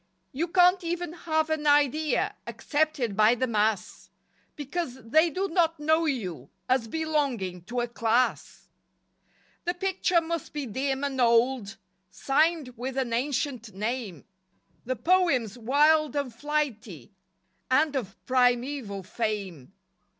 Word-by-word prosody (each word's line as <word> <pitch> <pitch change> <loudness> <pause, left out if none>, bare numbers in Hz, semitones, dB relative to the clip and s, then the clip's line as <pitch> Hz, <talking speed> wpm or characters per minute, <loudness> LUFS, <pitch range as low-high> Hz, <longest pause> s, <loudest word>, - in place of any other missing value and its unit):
You 310 +6 -2
can't 360 +1 +4
even 340 -1 -3
have 315 -2 -1
an 305 -1 -1
idea 290 +1 +2
Accepted 290 -8 -1
by 215 +3 +5
the 260 - 0
mass, 215 -3 -1 0.5
Because 295 -1 -4
they 315 +9 +3
do 380 +5 -2
not 330 -3 +1
know 315 +2 +2
you 180 - -3 0.2
As 255 -3 +1
belonging 270 - -2
to 245 +4 -2
a 240 - -2
"Class." 235 +1 -1 1.0
The 350 +1 -1
picture 370 -1 +1
must 335 -1 -5
be 295 -2 -3
dim 265 +4 -2
and 270 -2 -1
old 235 -2 +2 0.3
Signed 305 +1 +1
with 260 +2 -5
an 250 -3 -1
ancient 250 -3 -2
name, 215 - -4 0.6
The 255 +2 -1
poems 325 - +2
wild 295 +5 +3
and 280 -4 -2
flighty 235 - -3 0.6
And 290 +3 +3
of 200 -8 -3
primeval 245 -4 +1
fame. 195 - -4
265 Hz, 125 wpm, -27 LUFS, 230-315 Hz, 1.0 s, by